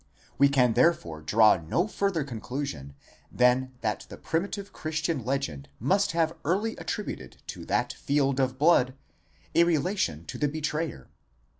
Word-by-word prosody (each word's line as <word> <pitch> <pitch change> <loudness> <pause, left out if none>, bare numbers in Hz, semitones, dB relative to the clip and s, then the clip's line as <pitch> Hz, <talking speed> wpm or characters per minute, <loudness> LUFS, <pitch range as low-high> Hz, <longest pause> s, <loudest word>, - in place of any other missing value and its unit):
We 140 0 +6
can 125 -4 +3
therefore 110 - +2
draw 105 +6 +5
no 85 - 0
further 195 -6 0
conclusion 110 - -5 0.4
than 125 +1 +3
that 105 -1 -2
the - - -9
primitive 200 +4 -3
Christian 155 -3 -2
legend 110 - -3
must 190 - +2
have 165 0 +1
early 205 +8 0
attributed 135 - -5
to - - -7
that - - 0
field 140 -1 0
of 130 -1 +1
blood 135 -4 +4 0.6
a 170 - +6
relation 160 - 0
to - - -7
the 150 - +2
betrayer. 150 - -3
140 Hz, 140 wpm, -27 LUFS, 115-165 Hz, 0.6 s, We